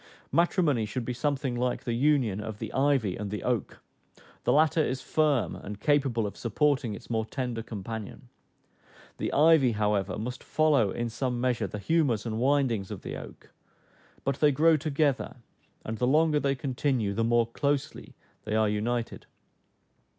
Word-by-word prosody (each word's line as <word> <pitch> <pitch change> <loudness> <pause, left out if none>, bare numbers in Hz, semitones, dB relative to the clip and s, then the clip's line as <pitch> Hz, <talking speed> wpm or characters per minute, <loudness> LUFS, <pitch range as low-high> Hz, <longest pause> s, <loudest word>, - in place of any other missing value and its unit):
Matrimony 155 - +2
should 120 +3 -4
be 125 - -2
something 135 0 -1
like 125 +1 -1
the 120 - -2
union 125 -6 +2
of 110 -1 -6
the 110 0 -6
ivy 135 -9 +2
and 105 -1 -5
the 105 +1 -5
oak: 125 -4 -2 0.6
the - - +3
latter 155 +1 +4
is 130 -2 -2
firm, 150 -2 +1
and 100 0 -8
capable 135 -4 +1
of 100 - -5
supporting 130 -1 0
its - - -11
more 110 -1 +1
tender 120 0 -4
companion; 110 -1 -7 0.9
the - - -2
ivy, 150 -5 +5
however, 105 -2 0
must 125 +4 -5
follow 150 -9 +2
in 120 +4 -2
some 125 +1 -2
measure 125 -1 0
the - - -6
humors 125 -3 +1
and 110 -1 -3
windings 130 -7 +1
of - - -7
the - - -5
oak; - - -11 0.7
but 135 -1 -1
they 150 -1 +5
grow 160 +4 +4
together, 145 -2 0 0.5
and 110 0 -4
the 125 - +2
longer 155 +2 +3
they 140 -1 0
continue 130 -6 -1
the 115 +3 0
more 120 0 +3
closely 140 +4 -3 0.3
they 110 - -2
are 110 0 +3
united. 115 +3 -2
125 Hz, 165 wpm, -28 LUFS, 110-145 Hz, 0.9 s, ivy